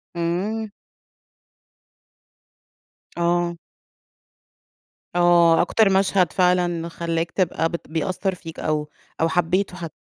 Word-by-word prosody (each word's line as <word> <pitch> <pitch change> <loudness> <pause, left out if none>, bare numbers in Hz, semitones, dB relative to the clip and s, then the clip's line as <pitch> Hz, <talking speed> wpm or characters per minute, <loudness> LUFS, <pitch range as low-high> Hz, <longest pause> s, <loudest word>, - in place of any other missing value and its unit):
إمم. 195 +6 -2 2.5
آه. 170 0 +1 1.6
آه. 175 -1 +5
أكتر 220 -3 +3
مشهد 190 -3 +2
فعلًا 175 -2 +1
خلّاك 165 0 -3
تبقى 170 -3 0
بت 170 - -6
بيأثّر 180 +4 -2
فيك 165 -2 -10
أو 150 -1 -2 0.3
أو 165 - +3
حبّيته 180 +2 0
حت 165 -3 -6
175 Hz, 90 wpm, -22 LUFS, 165-185 Hz, 2.5 s, آه